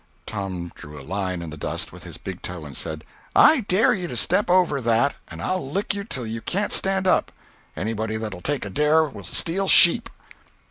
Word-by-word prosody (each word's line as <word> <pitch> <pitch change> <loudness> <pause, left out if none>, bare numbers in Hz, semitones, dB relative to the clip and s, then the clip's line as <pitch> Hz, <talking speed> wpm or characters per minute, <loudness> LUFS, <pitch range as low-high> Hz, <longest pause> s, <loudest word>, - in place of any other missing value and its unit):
Tom 95 -5 -4
drew 75 0 -11
a 70 - -11
line 95 -1 -3
in 80 - -7
the 75 - -8
dust - - -3
with - - -11
his - - -8
big - - -7
toe, 90 -3 -6
and 70 -3 -9
said: 80 +4 -5 0.3
"I 310 -2 +7
dare 200 0 +3
you 180 -3 -3
to 125 - -5
step 200 - +2
over 175 -6 +3
that, 120 +4 +2
and 80 +1 -8
I'll 185 - -2
lick 200 +7 -1
you 200 0 -4
till 130 - -4
you 115 +1 -4
can't 200 - -1
stand 190 -1 +2
up. 185 - +2 0.5
Anybody 110 +2 -2
that'll 105 -5 -5
take 140 -2 -2
a 100 - -6
dare 150 +6 +3
will 155 - -7
steal 190 +4 -1
sheep." 170 -2 +6
120 Hz, 205 wpm, -23 LUFS, -, 0.5 s, I